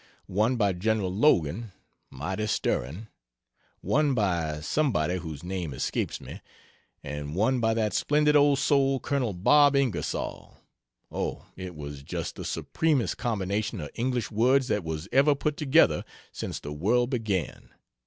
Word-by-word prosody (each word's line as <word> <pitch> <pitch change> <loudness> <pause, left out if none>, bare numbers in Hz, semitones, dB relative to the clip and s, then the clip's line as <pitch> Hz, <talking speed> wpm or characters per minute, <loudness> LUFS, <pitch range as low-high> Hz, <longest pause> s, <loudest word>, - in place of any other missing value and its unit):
one 110 +7 +1
by 100 -5 +2
Gen. 110 +5 0
Logan 95 - +1 0.4
(mighty 95 +11 -3
stirring), 90 - -2 0.7
one 145 -2 +2
by 85 -8 0
somebody 90 - 0
whose 80 -4 -7
name 90 -6 -4
escapes - - -2
me, - - -10 0.6
and 75 +1 -5
one 115 +7 +2
by 115 -1 +2
that 110 -2 0
splendid 150 0 +2
old 145 -1 +5
soul, 135 -1 +2
Col. 135 -5 -1
Bob 145 +10 +5
Ingersoll, 135 -5 -2 0.5
oh, - - -3
it 90 -2 -7
was 70 -2 -7
just 70 - -5
the - - -7
supremest 150 - 0
combination 105 -1 -2
of 75 - -6
English 125 0 -2
words 125 +4 +3
that 105 -3 0
was 80 +1 -4
ever 140 +2 +4
put 150 +1 -1
together 145 - +3 0.3
since - - -5
the 75 - -7
world 120 - +1
began. 105 - -2
110 Hz, 140 wpm, -27 LUFS, 85-135 Hz, 0.7 s, old